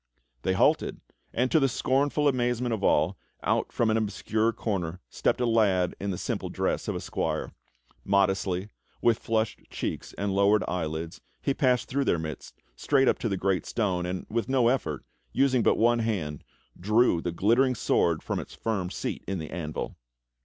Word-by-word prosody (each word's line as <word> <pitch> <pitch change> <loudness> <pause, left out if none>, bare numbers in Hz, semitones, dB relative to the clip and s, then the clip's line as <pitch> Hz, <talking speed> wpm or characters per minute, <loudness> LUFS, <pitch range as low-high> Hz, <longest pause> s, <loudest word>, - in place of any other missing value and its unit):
They 95 - +1
halted, 95 - +2 0.3
and 125 +2 0
to 160 - +5
the 135 -2 +3
scornful 140 +4 +1
amazement 125 -2 +1
of 105 -3 -3
all, - - +2 0.2
out - - +1
from 115 -2 +1
an 110 - +2
obscure 110 +1 0
corner 90 -7 -3
stepped - - +1
a 125 - +2
lad 100 -6 +2
in 100 - -3
the 90 - -2
simple - - -3
dress - - -1
of - - -1
a - - -2
squire. - - -2 0.5
Modestly, 95 -1 +1 0.3
with 120 -1 +4
flushed 110 -1 -1
cheeks - - -4
and 100 -1 -1
lowered 100 +1 +4
eyelids, 80 -1 -3 0.2
he 140 - 0
passed 125 -4 +2
through 140 +1 0
their - - +2
midst 80 -1 -6 0.2
straight 135 - +2
up - - +3
to 115 - -1
the 95 - -1
great 95 -3 0
stone, 90 -6 0
and, 90 0 -4
with 115 +3 -2
no 130 -3 +4
effort, 130 +2 -1 0.3
using 130 -3 +3
but - - +3
one 120 +1 +4
hand, 90 -11 -2 0.4
drew 105 -2 +3
the 85 - -2
glittering 120 +9 +3
sword 85 -6 +1
from - - -2
its - - -8
firm 100 -6 -2
seat - - -4
in 95 +1 -2
the 80 -3 -6
anvil! 80 -3 -4
105 Hz, 180 wpm, -27 LUFS, 90-120 Hz, 0.5 s, to